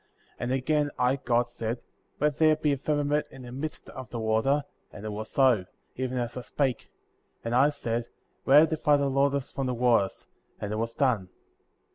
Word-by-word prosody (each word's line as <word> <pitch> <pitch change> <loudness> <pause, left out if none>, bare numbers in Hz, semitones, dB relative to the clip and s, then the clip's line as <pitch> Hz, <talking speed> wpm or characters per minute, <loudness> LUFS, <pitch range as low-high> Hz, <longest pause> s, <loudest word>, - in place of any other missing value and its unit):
6. - - -32
And 120 +1 -2
again, 145 +3 +1
I, 125 +2 +2
God, 120 -2 +1
said: 120 0 -4 0.4
Let 150 0 +1
there 155 -1 +6
be 150 -1 +1
a - - -1
firma 145 +2 0
ment 145 +1 0
in 135 - -12
the 120 - -9
midst 145 +5 -6
of 130 -1 -8
the 120 - -5
water, 110 +6 +2 0.3
and 105 +1 -10
it 110 - -3
was 110 +1 -5
so, 125 -8 +3 0.3
even 130 0 -2
as 120 -1 -2
I 125 - -4
spake; 130 +1 -2 0.6
and 115 - -1
I 135 +4 +5
said: 120 -5 -3 0.4
Let 145 +3 +8
it 160 - +1
divide 150 -2 +3
the 140 -1 +1
waters 140 0 +1
from 135 -1 -2
the 125 - -1
waters; 115 -5 +2 0.3
and 105 - -4
it - - -2
was 115 +1 -2
done; 125 -9 +2
7. - - -30
130 Hz, 210 wpm, -28 LUFS, 120-145 Hz, 0.6 s, Let